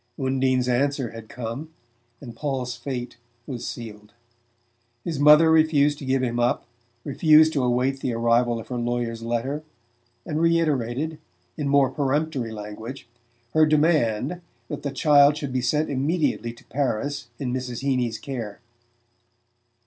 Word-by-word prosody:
Undine's 130 -1 +1
answer 135 0 0
had 115 -1 -10
come 125 +6 -6 0.5
and 120 -5 -9
Paul's 130 -2 -3
fate 125 0 -5 0.3
was 125 -4 -5
sealed. 105 -3 -8 0.9
His 160 -5 -3
mother 150 +2 +7
refused 150 -2 +3
to 140 - -7
give 130 0 +1
him 120 -1 -1
up, 120 0 +1 0.4
refused 155 +2 +5
to 140 - +1
await 125 +2 +1
the 130 - -2
arrival 115 +1 +2
of 115 - -10
her 125 - -3
lawyer's 120 -1 -2
letter, 120 +6 -2 0.6
and 155 +1 -2
reiterated, 155 -3 +1 0.4
in 150 -3 -3
more 140 -2 +4
peremptory 140 -3 -1
language, 110 +5 -8 0.5
her 155 0 +5
demand 155 -1 +2 0.3
that - - -5
the 145 - -2
child 145 +1 +5
should 140 -4 -4
be 130 - 0
sent 150 +5 +1
immediately 140 -4 0
to 120 - -17
Paris 140 0 -2
in 125 -3 -3
Mrs. 125 -1 -4
Heeny's 125 -5 0
care. 115 -4 -6
130 Hz, 140 wpm, -24 LUFS, 120-150 Hz, 0.9 s, mother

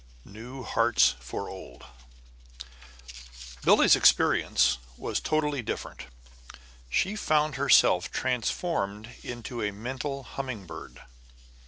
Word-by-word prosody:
IV - - -16
NEW 125 +5 -9
HEARTS 65 - +3
FOR 60 - -6
OLD 60 -1 -11 1.8
Billie's - - +6
experience 60 - +3 0.2
was - - -2
totally 150 -3 -1
different. 105 - -6 0.8
She 190 - 0
found 155 -6 +1
herself 135 -9 +4
transformed 115 - -2
into 120 0 -6
a 105 - 0
mental 130 +6 -5
humming 125 -4 -6
bird. - - -11
125 Hz, 100 wpm, -27 LUFS, 105-140 Hz, 1.8 s, Billie's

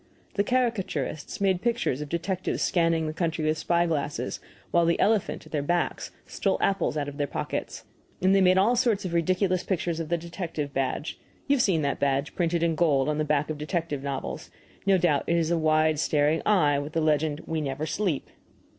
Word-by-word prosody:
The 200 - +1
caricaturists 200 - -1
made 190 -2 +1
pictures 235 - 0
of 150 - -6
detectives 180 +3 -2
scanning 165 -2 +2
the 155 - -3
country 165 -1 -1
with 155 0 +1
spy 170 0 +2
glasses, 150 -3 -2 0.3
while 170 - +4
the 170 0 +2
elephant, 215 -2 +1
at - - -15
their 150 - 0
backs, 175 +4 -1 0.2
stole - - -1
apples 195 -5 +1
out 145 -1 -1
of 145 0 -7
their 145 -1 0
pockets. - - -4 0.4
And 190 +1 +3
they 195 - +5
made 185 0 +5
all 215 +6 +4
sorts 235 -5 +1
of 175 - -3
ridiculous 185 +2 +1
pictures 175 -3 -1
of 160 -2 -4
the 170 - +1
detective 165 -4 -5
badge 135 +3 -2 0.3
you 285 - +3
have - - +2
seen 170 -9 +2
that 140 - -1
badge 140 +1 0
printed 170 -1 0
in 165 -1 +2
gold 150 -4 +2
on 150 0 -1
the - - +2
back 150 0 0
of 150 - -5
detective 155 -2 -2
novels 140 -1 -5 0.4
no 195 -1 +5
doubt, 160 -6 +2
it 170 - +2
is 165 0 +1
a 170 - +2
wide 155 -1 +2
staring 150 0 +2
eye, 150 -9 +4
with 145 +2 -6
the 165 - +1
legend, 155 0 +1
"WE 160 -1 -2
NEVER 140 +1 -3
SLEEP." 175 -3 -1
165 Hz, 205 wpm, -26 LUFS, 150-185 Hz, 0.4 s, they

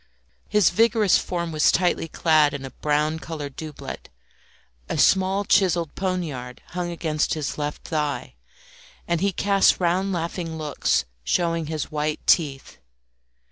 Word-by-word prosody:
His 210 -4 +4
vigorous 225 0 +4
form 170 -2 -3
was 155 -1 +4
tightly 175 -2 +1
clad 155 -3 +3
in 135 -1 -6
a 135 - -8
brown 150 +3 0
coloured 150 -4 -6
doublet; 155 -2 -8 0.8
a - - -2
small 190 +1 +3
chiselled 175 -6 +2
poniard 155 -10 -3
hung 180 -1 -3
against 160 -3 -1
his 150 -3 -3
left 145 0 -4
thigh, 150 -5 -2 0.7
and 170 -1 0
he 200 0 +2
cast 195 +1 +3
round 185 +2 +1
laughing 170 -1 -3
looks 150 - 0 0.2
showing 165 - 0
his 155 -1 -4
white 150 0 -2
teeth. 140 -5 +1
165 Hz, 135 wpm, -24 LUFS, 150-180 Hz, 0.8 s, His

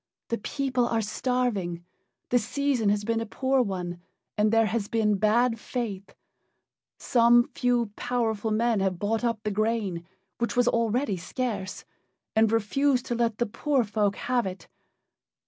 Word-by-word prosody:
The 230 - -1
people 255 +1 -1
are 230 -1 0
starving: 210 -6 -1 0.4
the 245 - +4
season 245 -1 0
has 205 0 +1
been 225 +1 0
a - - -3
poor 260 +4 +1
one, 180 -5 -3 0.3
and 210 0 +2
there 225 0 +4
has 215 -1 -1
been 210 -2 +1
bad 230 +2 +2
faith. 215 -6 -5 0.8
Some 240 0 +4
few 240 -3 +1
powerful 225 -3 -1
men 225 0 +2
have 190 -2 0
bought 215 +5 -1
up 230 -2 -1
the 210 - -1
grain, 205 -5 -1 0.3
which 235 0 -1
was 245 0 +3
already 230 -2 +1
scarce, 195 -1 -4 0.5
and 220 0 +4
refuse 250 +4 +2
to 245 - -3
let 230 -2 0
the 240 - +1
poor 265 +4 0
folk 205 -1 0
have 245 -4 0
it. 185 0 -7
225 Hz, 150 wpm, -27 LUFS, 205-245 Hz, 0.8 s, the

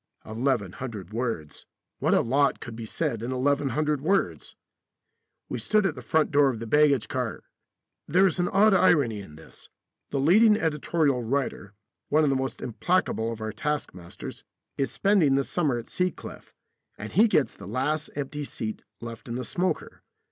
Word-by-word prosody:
Eleven 110 -4 -1
hundred 105 -5 -7
words 115 -11 -4 0.3
what - - +2
a - - +4
lot 140 +4 +2
could 115 - -8
be 115 -1 -6
said 125 -4 -2
in 120 - -4
1100 140 +2 0
words! 190 +6 0 0.9
We - - -4
stood 215 -2 +2
at 185 - +1
the - - -9
front 160 -1 +1
door 145 -1 +5
of 125 - -3
the 115 - -6
baggage 140 0 +3
car - - -3 0.6
(there 185 +3 +4
is 185 -1 +1
an 175 - +2
odd 205 +3 +4
irony 145 - +3
in 75 -6 -12
this: 80 - -14 0.4
the 140 - -1
leading 210 +9 +5
editorial 150 -4 +1
writer, 115 -5 -2 0.3
one 155 +2 +4
of 145 - +3
the - - +2
most 130 0 -3
implacable 120 -2 0
of 110 -1 -7
our 110 0 -3
taskmasters, 120 -13 -5 0.3
is 135 - -1
spending 190 -9 +3
the 140 - +2
summer 145 -5 0
at 115 - -7
Sea 180 0 0
Cliff, - - -11 0.5
and 105 - -7
he 215 +7 +6
gets 155 -10 +2
the - - -11
last 150 +4 -1
empty 145 +1 -4
seat 110 -5 -5 0.2
left 115 0 -8
in 115 - -4
the 125 0 -3
smoker. 185 +8 -2
140 Hz, 175 wpm, -26 LUFS, 115-160 Hz, 0.9 s, he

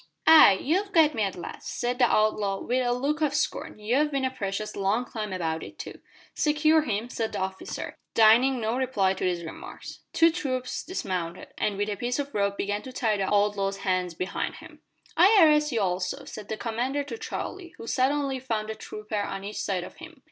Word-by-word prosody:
"Ay, 320 -10 +9
you've 385 +8 0
got 315 -3 +5
me 225 - -2
at 195 -2 0
last," 175 - -7
said 245 +1 -1
the 245 - +6
outlaw, 215 -3 +1
with 255 +1 0
a 245 - +1
look 280 +5 -1
of 290 -2 +1
scorn. 300 - -2
"You've 250 +8 +1
bin 275 -2 -1
a 260 - 0
precious 210 -3 -4
long 200 +5 0
time 215 -4 -5
about 165 -3 -2
it - - -10
too." - - -8 0.3
"Secure 310 +1 +3
him," 225 -5 -2
said 225 -3 -3
the - - -2
officer, 190 0 -5 0.2
deigning 240 +4 +5
no 225 +1 -1
reply 245 -8 +1
to 190 - -6
these 175 -2 0
remarks. 160 - -9
Two 330 0 +5
troopers 260 -7 -3
dismounted, 185 - -4
and 205 -2 -1
with 205 +1 0
a 210 - -2
piece 245 +3 -1
of 285 0 -4
rope 200 -1 0
began 205 +1 -1
to 260 - -9
tie 225 -4 0
the 195 -1 -1
outlaw's 200 -1 +1
hands 185 -2 0
behind 185 +3 -3
him. - - -14 0.3
"I 390 +6 +6
arrest 300 -1 +4
you 230 -3 0
also," 180 -1 -2
said 210 -1 -9
the 220 - -3
commander 245 +6 -2
to 290 +10 -7
Charlie, 380 -5 -6
who - - -9
suddenly 270 +2 0
found 220 -4 -3
a - - -5
trooper 215 0 -6
on 195 -1 -4
each 205 +1 -5
side 185 -3 -1
of - - -11
him. 330 -3 -12
225 Hz, 205 wpm, -27 LUFS, 200-275 Hz, 0.3 s, Ay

